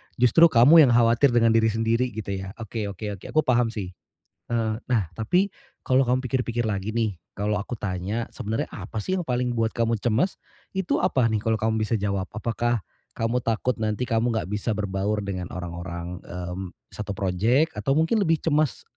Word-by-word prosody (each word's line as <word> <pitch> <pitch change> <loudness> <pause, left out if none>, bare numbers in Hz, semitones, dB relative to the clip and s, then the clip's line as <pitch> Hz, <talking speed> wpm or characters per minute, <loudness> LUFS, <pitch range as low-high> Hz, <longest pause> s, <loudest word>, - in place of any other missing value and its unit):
justru 125 +8 +6
kamu 145 +3 +7
yang 120 - +3
khawatir 120 +3 +5
dengan 115 -1 +5
diri 115 0 +4
sendiri 115 +3 +1
gitu 100 -3 -4
ya. 95 +2 -7
Oke 110 -1 -4
oke 100 0 -5
oke, - - -15
aku 155 - +2
paham 120 -2 +3
sih. 105 -5 -5 0.6
Eee, 110 -2 0
nah, 110 -9 0
tapi, 180 - +2 0.3
kalau 130 +1 +3
kamu 125 +1 +1
pikir-pikir 120 -3 -1
lagi 100 +1 -2
nih, 110 -5 -1 0.2
kalau 105 +1 -1
aku 105 +4 -5
tanya, 100 +4 -3
sebenarnya 110 +2 -3
apa 105 +2 -6
sih 185 - -1
yang 180 - -3
paling 125 -2 -1
buat 115 0 +1
kamu 115 -1 +1
cemas? 120 - 0 0.3
Itu 190 -2 -1
apa 130 -4 +2
nih, 110 -2 +1
kalau 110 0 +1
kamu 110 0 0
bisa 110 +1 0
jawab, 100 -2 -2
apakah 115 0 -1 0.3
kamu 115 +2 0
takut 115 +1 -1
nanti 110 +2 -1
kamu 115 -1 +1
enggak 95 -3 -2
bisa 105 +1 -1
berbaur 100 +1 -1
dengan 95 -3 -4
orang-orang, 85 0 -6
mmm, 90 +1 -6 0.2
satu 105 -1 -5
project 110 - +2
atau 135 -1 +1
mungkin 165 +9 +2
lebih 165 -5 +1
cemas 155 -3 +1
110 Hz, 185 wpm, -25 LUFS, 100-125 Hz, 0.6 s, kamu